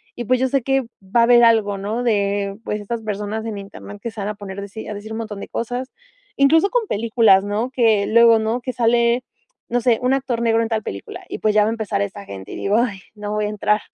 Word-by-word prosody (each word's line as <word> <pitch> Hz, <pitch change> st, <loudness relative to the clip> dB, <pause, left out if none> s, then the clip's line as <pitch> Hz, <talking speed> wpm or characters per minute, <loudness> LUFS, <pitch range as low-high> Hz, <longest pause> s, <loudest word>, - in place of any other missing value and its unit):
y, 240 Hz, -, -5 dB
pues, 255 Hz, +3 st, +3 dB
yo 260 Hz, 0 st, +1 dB
sé 275 Hz, -2 st, +1 dB
que 270 Hz, +1 st, +2 dB, 0.2 s
va 195 Hz, +5 st, +1 dB
a -, -, +6 dB
haber 240 Hz, 0 st, +6 dB
algo, 215 Hz, -3 st, +3 dB
¿no?, 215 Hz, +5 st, -3 dB
de, 200 Hz, -3 st, 0 dB
pues, 210 Hz, 0 st, -3 dB
estas 230 Hz, +3 st, -4 dB
personas 210 Hz, +1 st, -4 dB
en 220 Hz, -2 st, -4 dB
Internet 200 Hz, +1 st, -10 dB
que 235 Hz, -, -4 dB
se 220 Hz, -, -10 dB
van 200 Hz, -, -3 dB
a 210 Hz, -, -2 dB
poner 200 Hz, -1 st, -8 dB
deci 200 Hz, +2 st, -7 dB
a 210 Hz, -, -4 dB
decir 210 Hz, +2 st, -8 dB
un 220 Hz, -, -4 dB
montón 215 Hz, -3 st, -6 dB
de -, -, -7 dB
cosas. 245 Hz, +3 st, -4 dB, 0.5 s
Incluso 320 Hz, +7 st, +4 dB
con 475 Hz, -2 st, 0 dB
películas, 220 Hz, -3 st, +3 dB
¿no?, 210 Hz, +4 st, -1 dB
que 225 Hz, -5 st, +3 dB
luego, 230 Hz, 0 st, +6 dB
¿no?, 220 Hz, +2 st, -1 dB
que 255 Hz, +1 st, -5 dB
sale, 235 Hz, +1 st, +2 dB, 0.5 s
no 245 Hz, -, +1 dB
sé, 235 Hz, -1 st, +3 dB
un 250 Hz, +1 st, +2 dB
actor 260 Hz, -3 st, -1 dB
negro 230 Hz, -1 st, +2 dB
en 225 Hz, -, 0 dB
tal 220 Hz, -1 st, -1 dB
película. 395 Hz, -5 st, -7 dB
Y, -, -, -4 dB
pues, 215 Hz, -, +1 dB
ya 210 Hz, -, +6 dB
va 210 Hz, -, +1 dB
a -, -, -1 dB
empezar 215 Hz, -3 st, -2 dB
esta 200 Hz, 0 st, -5 dB
gente, 95 Hz, -, -9 dB
y -, -, -6 dB
digo: 205 Hz, +2 st, +1 dB
"Ay, 225 Hz, -6 st, -1 dB, 0.2 s
no 210 Hz, 0 st, -5 dB
voy 210 Hz, 0 st, 0 dB
a 210 Hz, -, -2 dB
entrar 210 Hz, 0 st, +1 dB
220 Hz, 260 wpm, -21 LUFS, 205-240 Hz, 0.5 s, a